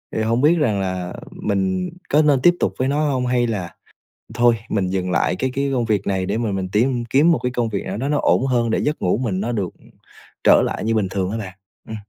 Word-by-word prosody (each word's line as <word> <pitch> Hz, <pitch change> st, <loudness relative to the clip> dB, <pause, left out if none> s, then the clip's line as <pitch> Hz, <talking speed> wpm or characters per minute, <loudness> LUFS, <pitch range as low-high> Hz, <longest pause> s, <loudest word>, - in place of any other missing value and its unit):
Thì 110 Hz, -, 0 dB
hông 115 Hz, +2 st, +1 dB
biết 155 Hz, +4 st, +5 dB
rằng 110 Hz, -10 st, +1 dB
là 90 Hz, -2 st, -3 dB, 0.2 s
mình 95 Hz, -3 st, -1 dB, 0.2 s
có 150 Hz, +2 st, +4 dB
nên 145 Hz, -4 st, +3 dB
tiếp 175 Hz, +5 st, +6 dB
tục -, -, 0 dB
với 130 Hz, -, +1 dB
nó 150 Hz, +1 st, +1 dB
hông? 125 Hz, -1 st, -1 dB
Hay 125 Hz, -1 st, +1 dB
là 95 Hz, -7 st, -4 dB, 0.6 s
thôi 120 Hz, 0 st, +4 dB
mình 95 Hz, -3 st, 0 dB
dừng 90 Hz, -1 st, -2 dB
lại 90 Hz, +1 st, +1 dB
cái 130 Hz, +4 st, -2 dB
cái 140 Hz, +1 st, -1 dB
công 120 Hz, -3 st, 0 dB
việc 105 Hz, -3 st, -1 dB
này 95 Hz, -1 st, 0 dB
để 105 Hz, +4 st, -1 dB
mà 115 Hz, -3 st, -1 dB
mình 95 Hz, -1 st, -3 dB
tím 120 Hz, +2 st, +1 dB
kiếm 140 Hz, +8 st, +4 dB
một 160 Hz, -, +2 dB
cái 125 Hz, -, 0 dB
công 120 Hz, -2 st, -1 dB
việc 100 Hz, -2 st, -3 dB
nào 95 Hz, -, -4 dB
đó 135 Hz, +4 st, -2 dB
nó 150 Hz, -, +1 dB
ổn 130 Hz, -, +2 dB
hơn, 120 Hz, -3 st, +1 dB
để -, -, +1 dB
giấc 150 Hz, +1 st, -2 dB
ngủ 90 Hz, -, +1 dB
mình 110 Hz, -7 st, -2 dB
nó 115 Hz, +5 st, -2 dB
được, 100 Hz, -7 st, -2 dB
ừm, -, -, -20 dB, 0.5 s
trở -, -, +6 dB
lại -, -, -3 dB
như 115 Hz, +1 st, 0 dB
bình 100 Hz, -3 st, +1 dB
thường 95 Hz, -1 st, -1 dB
hả 110 Hz, -, -3 dB
bạn? 95 Hz, -4 st, -6 dB, 0.3 s
Ừm. 110 Hz, -, -6 dB
115 Hz, 265 wpm, -21 LUFS, 95-130 Hz, 0.6 s, tiếp